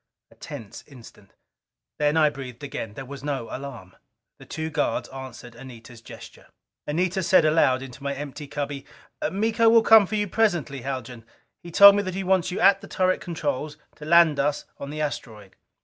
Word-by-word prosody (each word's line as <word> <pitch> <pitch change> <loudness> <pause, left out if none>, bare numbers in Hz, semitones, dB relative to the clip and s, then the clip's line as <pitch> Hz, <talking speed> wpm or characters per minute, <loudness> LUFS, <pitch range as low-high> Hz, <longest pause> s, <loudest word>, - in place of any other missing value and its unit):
A - - -20
tense 110 -3 -10
instant. 115 -7 -16 0.6
Then 150 +1 +2
I 155 -2 +4
breathed 130 -2 -9
again. 115 -6 -6
There 135 - -7
was 140 0 -10
no 140 -5 -4
alarm. 125 -9 -9 0.4
The - - -15
two 160 0 -5
guards 145 0 -1
answered 130 -2 -10
Anita's 120 -2 -12
gesture. - - -13 0.4
Anita 180 +5 -1
said 180 -2 +4
aloud 135 -4 +3
into 135 +1 -11
my 140 0 -3
empty 145 +1 -7
cubby: 140 -1 -5 0.4
"Miko 225 +3 +2
will 225 0 +5
come 220 -3 +7
for 215 - -3
you 210 -1 0
presently, 175 - 0
Haljan. 125 -3 -6 0.4
He 175 - -10
told 200 +4 +9
me - - +2
that 185 -2 -5
he 195 - -3
wants 185 -1 +1
you 180 - -4
at 195 +1 +5
the - - -11
turret 185 0 0
controls 155 -3 -4 0.2
to 150 - -10
land 165 -2 +5
us 145 +1 -1
on 140 - -7
the 155 +1 -5
asteroid." 110 -9 -6
145 Hz, 180 wpm, -24 LUFS, 130-180 Hz, 0.6 s, told